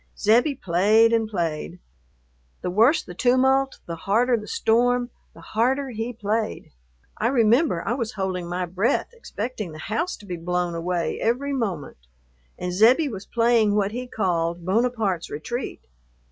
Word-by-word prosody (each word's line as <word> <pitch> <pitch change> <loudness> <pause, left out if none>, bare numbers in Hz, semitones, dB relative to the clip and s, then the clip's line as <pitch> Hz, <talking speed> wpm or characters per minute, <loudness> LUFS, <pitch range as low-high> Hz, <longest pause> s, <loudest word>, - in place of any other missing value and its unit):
Zebbie 240 +7 +3
played 215 +3 +3
and 225 -1 +1
played. 165 -7 -3 0.8
The 180 - -2
worse 230 - +4
the 180 - -10
tumult, 265 +5 +2
the 170 - -5
harder 230 +8 +2
the 210 -2 -5
storm, 245 +3 +1 0.2
the - - -13
harder 260 +5 0
he 225 +1 -3
played. 215 -1 -3 0.5
I 225 - +2
remember 235 - +3
I 230 - +1
was 235 -3 -3
holding 185 -4 -3
my 180 +1 -2
breath, 185 +6 0
expecting 225 - -6
the - - -9 0.2
house 340 +8 -1
to 210 - -15
be 180 -3 -5
blown 180 +1 -1
away 170 +1 -2
every 265 +5 0
moment, 195 - -3 0.6
and 180 0 -4
Zebbie 245 - +5
was 200 -4 -8
playing 230 -3 +3
what 205 -1 +1
he 250 +2 -5
called 170 -6 -1
"Bonaparte's 215 -3 0
Retreat." 240 - -5
220 Hz, 150 wpm, -24 LUFS, 180-245 Hz, 0.8 s, Zebbie